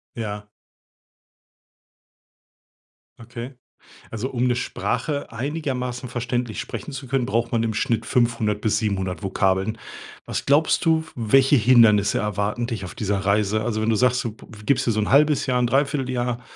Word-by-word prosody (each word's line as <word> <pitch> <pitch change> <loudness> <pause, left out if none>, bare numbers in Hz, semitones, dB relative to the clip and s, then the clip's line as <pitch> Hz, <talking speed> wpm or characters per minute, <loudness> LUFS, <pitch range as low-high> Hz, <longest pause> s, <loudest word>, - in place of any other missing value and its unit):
Ja. 105 -2 -5 2.7
Okay. 120 +3 -8 0.6
Also 115 +4 -4
um 125 0 0
'ne 125 - +2
Sprache 145 +3 -3
einigermaßen 125 -1 -3
verständlich 120 -2 -3
sprechen - - -6
zu 135 -1 -7
können, 130 0 0
braucht 115 -1 0
man 115 - +1
im 110 -1 -1
Schnitt 115 0 0
500 115 -4 +1
bis 105 0 +1
700 95 -4 -2
Vokabeln. 95 +2 0 0.5
Was - - -4
glaubst 145 +3 +3
du, 160 -1 +3
w - - -16
welche 130 +5 +4
Hindernisse 110 -4 +5
erwarten 105 +3 -1
dich 110 -6 -4
auf 90 - -9
dieser 100 -2 -1
Reise? 100 +2 +1
Also, 110 -1 -1
wenn 110 - 0
du 115 - +3
sagst, 125 +2 +2
du 115 - -3
p 110 - -16 0.2
gibst 135 -1 +1
dir - - +4
so 110 - -1
'n 105 - 0
halbes 145 +1 +4
Jahr, 125 -2 +1
'n 120 - +2
Dreivierteljahr, 130 -3 0
120 Hz, 160 wpm, -23 LUFS, 105-130 Hz, 2.7 s, Hindernisse